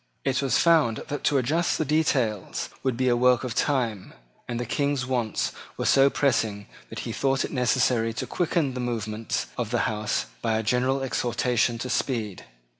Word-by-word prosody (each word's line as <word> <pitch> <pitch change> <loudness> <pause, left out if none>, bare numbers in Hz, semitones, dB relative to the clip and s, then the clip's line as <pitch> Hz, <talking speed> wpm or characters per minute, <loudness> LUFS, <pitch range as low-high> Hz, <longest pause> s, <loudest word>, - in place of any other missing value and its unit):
It 130 -1 +1
was 135 -2 +2
found 155 -10 +3
that 145 - -4
to 145 - +3
adjust 155 +7 +1
the 155 - 0
details 130 - 0
would 130 -3 -1
be 130 0 +1
a 120 - +4
work 125 0 +3
of 125 -3 -3
time; 115 - -1 0.3
and 120 -1 -3
the 120 - -2
King's 140 +1 0
wants 120 -4 -1 0.3
were - - -2
so 135 0 +5
pressing 110 -8 0 0.2
that - - -6
he - - -5
thought 135 -1 0
it - - -7
necessary 125 -2 +2
to 120 - -3
quicken 165 -5 0
the 125 - -5
movements 115 -2 -2
of 120 -3 -1
the 120 0 +1
House 105 0 -1 0.2
by 110 -1 +1
a 110 - -1
gentle 130 +4 +1
exhortation 120 -2 0
to 120 - -4
speed. 110 -7 -2
125 Hz, 185 wpm, -26 LUFS, 115-135 Hz, 0.3 s, so